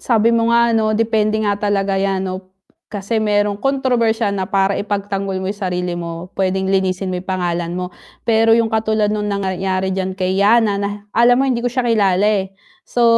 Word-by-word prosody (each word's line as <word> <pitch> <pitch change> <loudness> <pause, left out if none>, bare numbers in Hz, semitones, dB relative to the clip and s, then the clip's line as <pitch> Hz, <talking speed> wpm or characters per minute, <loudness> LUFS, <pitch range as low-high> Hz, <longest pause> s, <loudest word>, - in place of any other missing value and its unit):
sabi 230 -1 +2
mo 230 0 +2
nga 235 0 +4
'no 215 -1 +1
depende 220 -1 +1
nga 205 -1 +1
talaga 200 -1 0
yan 195 -1 0
'no, 185 0 -4 0.5
kasi 205 +2 -3
merong 205 -1 +1
kontrobersyal 240 -6 +1
na 190 -2 -3
para 195 0 +1
ipagtanggol 200 -1 -3
mo 190 - -3
yung 200 - -4
sarili 180 -1 -2
mo, 170 +1 -7
pwedeng 190 0 0
linisin 190 0 0
mo 180 - -3
yung 185 - -17
pangalan 175 -2 -2
mo. 180 0 -4 0.3
Pero 225 0 +4
yung 230 -1 +1
katulad 220 -1 +1
nung 210 -1 -2
nangyari 190 -1 -1
diyan 190 0 -2
kay 185 0 -1
Yannah 210 -1 +3
na 200 - -1 0.2
alam 240 +1 +4
mo 270 - +2
hindi 250 -3 0
ko 245 - 0
siya 250 +1 -2
kilala 205 -4 +2 0.2
eh. 195 - -15 0.3
So, 240 - -1
200 Hz, 190 wpm, -18 LUFS, 190-225 Hz, 0.5 s, nga